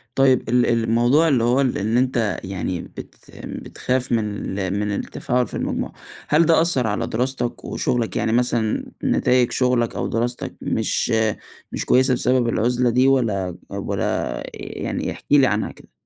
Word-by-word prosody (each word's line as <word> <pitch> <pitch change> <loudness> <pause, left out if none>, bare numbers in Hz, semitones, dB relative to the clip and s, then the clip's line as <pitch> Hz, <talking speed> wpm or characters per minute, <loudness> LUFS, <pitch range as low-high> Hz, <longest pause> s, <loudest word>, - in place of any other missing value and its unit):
طيب 135 -2 +3
ال 125 +1 +3
ال 115 -1 +1
الموضوع 120 +8 +3
اللي 130 -7 +2
هو 125 +3 +3
إن 115 -4 0
أنت 125 -4 +1
يعني 95 -2 -3
بت - - -11 0.3
بتخاف 130 0 -3
من 105 -3 -2
ال 95 -1 -1
من 105 0 -1
التفاعل 125 +4 -1
في - - -12
المجموعة، - - -3 0.3
هل 155 +3 +4
ده 160 0 +4
أثّر 135 -9 +1
على 105 - -1
دراستك 125 +1 -2
وشغلك 120 -3 -1
يعني 110 - 0
مثلًا 120 -2 +1 0.2
نتايج 125 -1 +2
شغلك، 125 -2 +1
أو - - -2
دراستك 120 +2 -2
مش - - 0 0.6
مش - - -3
كويسة 130 +1 +4
بسبب 125 0 +2
العزلة 120 +2 +1
دي؟ 125 +3 +3
والّا 105 -9 +1
والّا - - -2
يعني - - -4
احكِ - - -11
لي 140 -2 +6
عنها 105 -1 -1
كده. - - -18
120 Hz, 155 wpm, -22 LUFS, 110-130 Hz, 0.6 s, لي